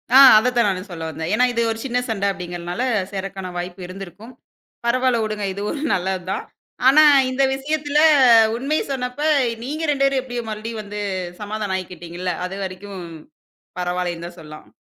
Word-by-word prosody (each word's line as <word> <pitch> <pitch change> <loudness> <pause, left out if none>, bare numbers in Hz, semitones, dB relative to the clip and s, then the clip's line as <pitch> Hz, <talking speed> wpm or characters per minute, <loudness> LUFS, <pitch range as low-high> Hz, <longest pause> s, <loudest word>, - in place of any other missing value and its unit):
ஆ, - - +10 0.2
அத 240 +4 +3
தான் 235 -3 +4
நானும் 190 0 -3
சொல்ல 165 -2 -5
வந்தேன். 160 +1 -5
ஏன்னா, 250 +4 +4
இது 235 - 0
ஒரு 225 - -5
சின்ன 245 -1 0
சண்டை 200 -3 0
அப்படிங்கறதுனால, 175 +2 -5 0.3
சேரக்கான 195 -1 -5
வாய்ப்பு 175 +1 -6
இருந்திருக்கும். 195 +5 -10 0.5
பரவால்ல 250 0 +2
உடுங்க, 215 -1 -3
இது 200 - -6
ஒரு 295 - -5
நல்லது 185 0 -1
தான். - - -2 0.4
ஆனா, 295 +4 +7 0.3
இந்த 265 +1 +1
விஷயத்துல 295 +1 -1 0.6
உண்மைய 275 +6 -1
சொன்னப்ப, 250 +1 -3 0.4
நீங்க 300 +5 -4
ரெண்டு 275 -1 0
பேரும் 275 -1 +2
எப்டி 245 -2 -8 0.2
மறுபடியும் 215 +1 -5
வந்து 210 0 -7 0.4
சமாதானம் 210 -2 -3
ஆயிக்கிட்டீங்கள்ல! 180 0 -5
அதுவரைக்கும் 190 0 -6 0.7
பரவாயில்லைன்னு 175 -1 -2
தான் 175 0 -13
சொல்லாம். 155 -1 -12
200 Hz, 155 wpm, -21 LUFS, 180-250 Hz, 0.7 s, ஆ